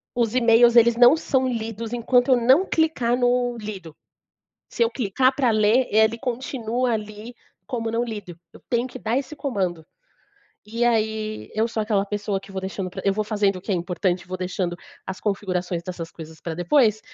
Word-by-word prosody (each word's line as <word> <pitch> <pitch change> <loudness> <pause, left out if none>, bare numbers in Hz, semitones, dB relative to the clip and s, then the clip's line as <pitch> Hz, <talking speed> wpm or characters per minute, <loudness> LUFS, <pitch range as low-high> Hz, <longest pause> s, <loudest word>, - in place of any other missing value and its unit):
os 235 -1 0
e-mails 235 -1 +5
eles 235 0 +6
não 245 +4 +7
são 265 -4 0
lidos 225 -1 -4
enquanto 245 +2 +2
eu 255 - +6
não 260 +10 +4
clicar 260 -7 +1
no 245 -1 +1
lido. 195 -7 -8 0.7
Se 235 - +1
eu 230 - +1
clicar 255 +3 +1
pra 260 -4 +2
ler, 215 +4 +3
ele 220 +2 +3
continua 250 -1 -2
ali 215 +2 -6 0.3
como 230 -4 -3
não 230 +1 0
lido, 205 -7 -7 0.2
eu - - -15
tenho 240 +1 0
que 260 - -9
dar 225 +2 -1
esse 280 +2 -4
comando. 185 - -3 0.8
E, 230 +2 -1
aí, 220 -2 -1
eu 220 +2 +1
sou 225 -1 -3
aquela 210 -2 +1
pessoa 205 -1 -3
que 195 - -15
vou 190 -1 -4
deixando 190 -1 -5
pra - - -7
eu 195 - +3
vou 215 +2 -1
fazendo 205 -2 +1
o - - -7
que 195 - -7
é - - +2
importante, 180 0 -2
vou 185 0 -5
deixando 180 -1 -3 0.3
as 190 0 -6
configurações 185 -4 -2
dessas 170 -2 -6
coisas 160 -1 -11
pra 165 -2 -5
depois, 215 - +2
220 Hz, 190 wpm, -23 LUFS, 195-245 Hz, 0.8 s, não